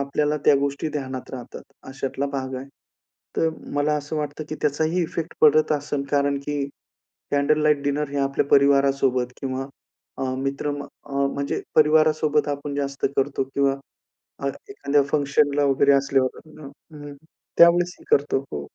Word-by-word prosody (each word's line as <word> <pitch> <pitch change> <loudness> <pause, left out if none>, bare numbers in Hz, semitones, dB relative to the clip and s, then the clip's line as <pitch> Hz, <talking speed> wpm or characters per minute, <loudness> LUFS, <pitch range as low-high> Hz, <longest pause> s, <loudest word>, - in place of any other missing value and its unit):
आपल्याला 145 +2 0
त्या 145 - +6
गोष्टी 140 +2 -2
ध्यानात 130 -3 -5
राहतात, 125 -2 -8 0.3
अशातला 135 +1 -3
भाग 130 -1 -3
आहे. 130 - -7 0.7
तर 165 - +2 0.3
मला 145 +1 +1
असं 150 +2 -5
वाटतं 150 0 -4
की 155 - -4
त्याचाही 160 +4 +1
इफेक्ट 165 0 -4
पडत 155 +1 +5
असेल, 145 -1 -2
कारण 140 -1 +1
की 145 -1 -1 0.7
कॅन्डल 145 +2 +2
लाईट 150 -2 +3
डिनर 145 +1 -1
हे 140 - -2
आपल्या 135 0 +1
परिवारासोबत 140 -3 +3
किंवा 135 0 -3 0.5
अ, - - -2
मित्र 140 +2 -2 0.3
अ, - - -13 0.2
म्हणजे 140 0 -2
परिवारासोबत 155 -1 +3
आपण 145 0 -4
जास्त 140 -1 -2
करतो 135 0 +1
किंवा 140 -1 +2 0.6
अ, - - -2 0.2
एखाद्या 145 - +1
फंक्शनला 145 0 +2
वगैरे 140 0 +4
असल्यावर. 135 -1 +1 0.2
हं, 140 -2 -9 0.3
हं. 145 0 -8 0.4
त्यावेळेसही 175 +1 +5
करतो, 140 -1 +2
हो. 70 -1 -4
140 Hz, 145 wpm, -23 LUFS, 140-150 Hz, 0.7 s, त्या